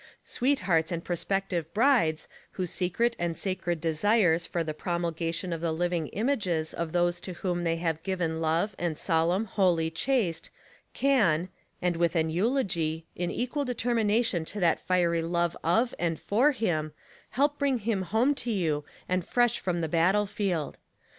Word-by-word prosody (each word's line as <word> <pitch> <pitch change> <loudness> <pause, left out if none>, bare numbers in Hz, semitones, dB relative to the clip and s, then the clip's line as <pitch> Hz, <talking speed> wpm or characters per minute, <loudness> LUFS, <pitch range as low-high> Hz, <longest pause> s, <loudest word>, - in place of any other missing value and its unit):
Sweethearts 185 - +1
and 170 -1 -3
prospective 175 -1 -2
brides 225 - +3 0.3
whose 180 -3 -3
secret 230 +7 0
and 170 -1 -1
sacred 175 -3 -2
desires 170 +1 +2
for 170 - -1
the 155 -1 -4
promulgation 170 +1 -2
of 165 - -4
the 170 -1 0
living 170 -1 -1
images 190 - -1
of 170 -1 -3
those 175 0 +1
to 185 - -6
whom 175 -1 -2
they 165 -1 +1
have 165 -1 -2
given 170 -3 -2
love 165 +6 +1
and 170 -3 -1
solemn, 170 +6 +1
holy, 180 -6 +1
chaste 180 -3 0 0.5
can, 190 - +2 0.3
and 175 -2 +1
with 170 0 +1
an 160 -1 +1
eulogy 170 - 0
in 175 0 -2
equal 255 +4 -2
de 250 -2 -3
termination 225 -5 +1
to 205 +6 -6
that 170 -3 +3
fiery 170 -2 +1
love 170 +1 0
of 225 +10 +2
and 165 -2 -1
for 250 +9 +3
him, 160 - -1 0.4
help 290 +2 +1
bring 280 -2 +2
him 220 -3 -1
:home 220 +10 +2
to 245 - -5
you 160 -9 0 0.2
and 185 0 0
fresh 240 +4 +2
from 175 -2 -1
the 160 - -1
battlefield. 185 0 0
175 Hz, 160 wpm, -28 LUFS, 165-210 Hz, 0.5 s, brides